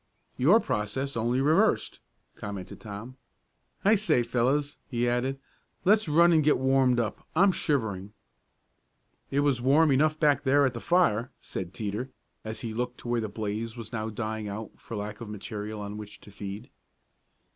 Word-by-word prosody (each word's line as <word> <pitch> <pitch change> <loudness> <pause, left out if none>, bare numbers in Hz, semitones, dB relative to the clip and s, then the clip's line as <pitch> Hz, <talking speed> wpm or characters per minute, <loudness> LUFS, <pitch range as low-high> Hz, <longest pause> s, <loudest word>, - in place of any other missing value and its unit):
"Your 170 - +5
process, 130 - -2
only 120 +3 +1
reversed," 165 +10 +2 0.4
commented 100 -3 -7
Tom. 115 +4 -8 0.7
"I 210 - +6
say 185 - +3
fellows," 135 +5 0
he 120 -1 0
added, 125 +3 0 0.5
"let's 210 -2 +4
run 170 +3 +6
and 155 -2 +4
get 150 - +4
warmed 130 -1 +3
up. 115 -3 -3
I'm 195 +4 +5
shivering." 105 - -1 1.2
"It 140 - +1
was 140 -4 +2
warm 145 +4 +4
enough 155 +3 +3
back 150 -3 +3
there 140 +1 +4
at 130 - 0
the 115 - -6
fire," 130 -10 +2
said 90 -2 -5
Teeter, 110 +5 -4 0.3
as 110 0 -5
he 115 -2 -4
looked 125 +2 -3
to - - -9
where 120 -1 +1
the 110 - -3
blaze 110 +2 -4
was 115 0 -8
now 110 -1 -2
dying 110 0 -4
out 105 +2 -6
for 115 - -8
lack 105 +2 -5
of 115 - -6
material 105 0 -6
on 105 +1 -6
which 105 -1 -9
to 105 - -14
feed. 100 +1 -7
120 Hz, 165 wpm, -28 LUFS, 105-145 Hz, 1.2 s, I